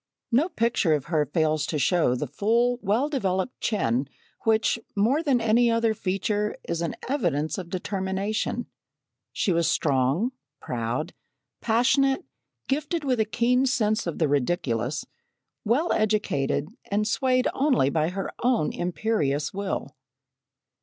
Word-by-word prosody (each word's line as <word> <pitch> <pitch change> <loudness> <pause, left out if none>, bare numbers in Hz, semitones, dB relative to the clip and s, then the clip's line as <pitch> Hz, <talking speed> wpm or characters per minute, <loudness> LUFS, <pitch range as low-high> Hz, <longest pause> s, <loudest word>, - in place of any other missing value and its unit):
No 280 +10 +3
picture 230 - +2
of 140 -4 -4
her 150 -2 +2
fails 155 0 +1
to 155 - -1
show 155 -4 +2
the 140 - -2
full, 230 - +1
well 225 +9 +1
developed 195 -6 -2
chin, 130 - 0 0.4
which, 225 +1 +2 0.2
more 235 +10 +2
than 275 -6 +2
any 230 +1 +3
other 230 -1 +2
feature 205 +2 -1
is 170 0 -2
an 170 - -2
evidence 175 - 0
of 175 -2 -7
determination. 195 +5 -2 0.7
She 195 - 0
was 170 -1 +2
strong, 140 - +1 0.3
proud, 120 +4 -3 0.5
passionate, 265 +7 +2 0.4
gifted 300 +4 -1
with 255 -4 0
a 220 - +3
keen 245 +4 +2
sense 215 -5 +1
of 170 - -3
the 160 - +2
ridiculous, 140 -2 -1 0.6
well 255 +10 +2
educated, 200 -9 0 0.2
and 210 +1 +1
swayed 255 +2 +2
only 260 - +2
by 155 +1 +1
her 195 +2 -4
own 245 -10 +1
imperious 175 -6 -1
will. 195 -7 -4
205 Hz, 135 wpm, -26 LUFS, 155-240 Hz, 0.7 s, No